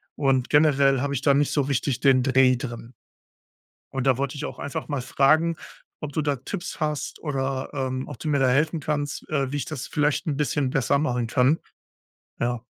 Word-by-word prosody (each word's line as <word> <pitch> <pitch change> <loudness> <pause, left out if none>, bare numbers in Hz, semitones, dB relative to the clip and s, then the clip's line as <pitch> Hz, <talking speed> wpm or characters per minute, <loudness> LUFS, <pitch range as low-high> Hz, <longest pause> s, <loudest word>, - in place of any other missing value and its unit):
und 135 -3 +1
generell 140 -3 +4
habe 140 +1 -1
ich 130 - -2
da 140 0 +4
nicht 145 +1 +2
so 145 -2 +1
wichtig 135 -1 0
den 135 -2 +5
Dreh 130 -1 +4
drin. 120 -2 -7 1.0
Und 135 -1 -2
da 130 -2 +4
wollte 140 +1 -2
ich 145 - -5
auch - - -6
einfach 140 - -5
mal 145 -3 -2
fragen, 155 +6 +2 0.4
ob 150 -1 -5
du 155 - -1
da 145 -1 0
Tipps 175 +9 -6
hast 150 -1 -2
oder, 135 -3 -2
ähm, 130 -2 -3
ob 145 - -8
du 155 - -5
mir 145 -2 +2
da 135 -1 +3
helfen 155 +5 +2
kannst, 145 0 -3
äh, 140 -4 0
wie - - -1
ich 145 - -2
das 155 -5 -6
vielleicht 150 -1 0
ein 150 -3 -1
bisschen 145 -2 0
besser 135 +2 +1
machen 125 -5 0
kann. 130 +7 +3 0.8
Ja. 120 0 -2
140 Hz, 200 wpm, -24 LUFS, 130-150 Hz, 1.0 s, den